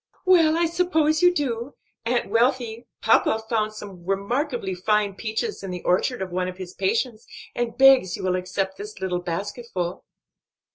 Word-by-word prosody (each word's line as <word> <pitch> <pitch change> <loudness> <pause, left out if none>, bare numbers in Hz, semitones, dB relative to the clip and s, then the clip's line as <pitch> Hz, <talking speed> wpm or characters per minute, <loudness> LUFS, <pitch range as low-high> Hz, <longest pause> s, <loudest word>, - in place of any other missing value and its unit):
"Well, 330 -4 +5
I 340 - +3
suppose 320 -3 +1
you 355 0 +6
do. 270 -5 -3 0.3
Aunt 240 -4 0
Wealthy, 235 0 +1 0.2
papa 220 0 +4
found 215 -2 0
some 200 -4 -10
remarkably 200 - -1
fine 205 +2 +1
peaches 220 - -3
in 195 - -6
the 180 -1 -5
orchard 190 +5 +1
of 185 - -7
one 180 +1 -1
of 185 0 -6
his 185 -1 -8
patients, 220 +3 -1 0.3
and 240 -1 -3
begs 265 -9 +6
you - - -7
will 185 -1 +1
accept 190 +1 -2
this 210 0 -8
little 180 -2 -2
basketful." 180 +1 -4
215 Hz, 160 wpm, -24 LUFS, 190-255 Hz, 0.3 s, you